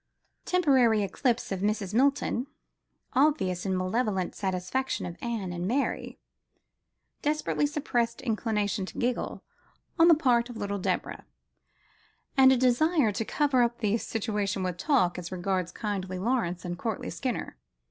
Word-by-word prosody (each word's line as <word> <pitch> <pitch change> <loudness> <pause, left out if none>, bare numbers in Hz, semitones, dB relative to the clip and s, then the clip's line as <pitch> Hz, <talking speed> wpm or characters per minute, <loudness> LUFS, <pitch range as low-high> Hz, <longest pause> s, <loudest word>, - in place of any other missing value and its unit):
Temporary 260 - +3
eclipse 235 +5 -1
of 190 - -1
Mrs. 205 -1 -1
Milton: 265 0 +2 0.7
obvious 245 - +2
and 190 -1 0
malevolent 190 0 -1
satisfaction 190 +7 -2
of 175 -1 -6
Anne 220 -7 -3
and 175 +1 -3
Mary: 265 +6 -1 1.0
desperately 300 0 0
suppressed 245 -6 -1
inclination 215 -4 -1
to - - -10
giggle 245 0 -2 0.6
on 330 - +7
the 335 - +8
part 245 -5 +2
of 240 - -8
little 200 -1 -3
Deborah: - - -3 1.1
and 265 -1 +7
a 265 - +4
desire 255 +1 +3
to 205 - -2
cover 280 +1 +2
up 240 0 +1
the 210 -2 +1
situation 205 -4 -2
with 180 -1 -2
talk, 190 - +2
as 175 0 -7
regards 185 -1 -1
kindly 190 -4 -3
Lawrence 185 -5 -1
and 175 0 -4
courtly 225 -1 -3
Skinner. 255 -2 -4
225 Hz, 135 wpm, -28 LUFS, 190-260 Hz, 1.1 s, the